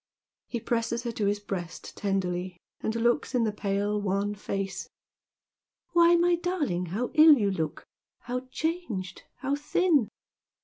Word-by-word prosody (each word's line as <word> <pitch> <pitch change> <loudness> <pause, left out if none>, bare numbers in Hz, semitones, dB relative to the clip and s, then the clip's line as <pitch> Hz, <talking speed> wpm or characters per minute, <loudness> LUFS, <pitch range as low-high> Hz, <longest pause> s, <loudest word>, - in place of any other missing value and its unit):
He 235 - -3
presses 235 0 -1
her 240 - -2
to 215 -3 -1
his 205 +1 +1
breast 185 -5 -6
tenderly, 185 -2 -2 0.2
and 220 - -1
looks 240 +2 +1
in 240 - +3
the 220 - +1
pale, 205 0 -1
wan 200 +1 0
face. 195 -1 -4 1.0
"Why, 345 0 +6
my 345 0 +3
darling, 305 - -1
how 215 +9 -2
ill 310 0 +9
you 205 -4 +1
look 160 -5 -3 0.2
— - - -31
^how 250 +1 -3
changed 255 - -3
— - - -51
how 275 +1 0
thin 295 - +2
220 Hz, 150 wpm, -28 LUFS, 195-275 Hz, 1.0 s, ill